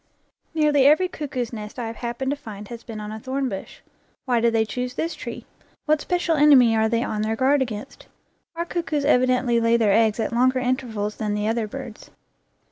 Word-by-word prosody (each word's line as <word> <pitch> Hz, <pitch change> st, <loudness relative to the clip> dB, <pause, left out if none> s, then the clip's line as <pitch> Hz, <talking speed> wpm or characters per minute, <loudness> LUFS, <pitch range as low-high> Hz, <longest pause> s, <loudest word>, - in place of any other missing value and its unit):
Nearly 295 Hz, -3 st, +4 dB
every 315 Hz, +6 st, +5 dB
cuckoo's 260 Hz, -8 st, -4 dB
nest 210 Hz, 0 st, -7 dB
I 240 Hz, -, -3 dB
have 225 Hz, 0 st, -6 dB
happened 240 Hz, +3 st, -3 dB
to -, -, 0 dB
find 210 Hz, -7 st, -9 dB
has 235 Hz, -1 st, -8 dB
been 225 Hz, -3 st, -7 dB
on 210 Hz, 0 st, -6 dB
a 220 Hz, -, -6 dB
thorn 265 Hz, +3 st, -2 dB
bush. 195 Hz, -3 st, -8 dB, 0.4 s
Why 245 Hz, -3 st, +1 dB
do 235 Hz, -, +4 dB
they 225 Hz, -1 st, +1 dB
choose 250 Hz, +2 st, -4 dB
this 330 Hz, +1 st, -2 dB
tree? 240 Hz, -6 st, -7 dB, 0.4 s
What 305 Hz, -1 st, +2 dB
special 350 Hz, -2 st, 0 dB
enemy 275 Hz, -6 st, +6 dB
are 220 Hz, 0 st, +2 dB
they 230 Hz, +1 st, +1 dB
on 210 Hz, -3 st, -2 dB
their 220 Hz, +1 st, 0 dB
guard 270 Hz, +4 st, +3 dB
against? 240 Hz, +1 st, -5 dB, 0.5 s
Our 340 Hz, +1 st, -2 dB
cuckoos 325 Hz, -5 st, -2 dB
evidently 250 Hz, -2 st, +3 dB
lay 230 Hz, 0 st, +3 dB
their 215 Hz, -4 st, +3 dB
eggs 220 Hz, 0 st, +3 dB
at 225 Hz, -, -1 dB
longer 255 Hz, +2 st, +3 dB
intervals 245 Hz, -5 st, -2 dB
than 210 Hz, -2 st, -2 dB
the 210 Hz, 0 st, -1 dB
other 225 Hz, -1 st, 0 dB
birds. 245 Hz, -1 st, -9 dB
240 Hz, 205 wpm, -23 LUFS, 220-275 Hz, 0.5 s, enemy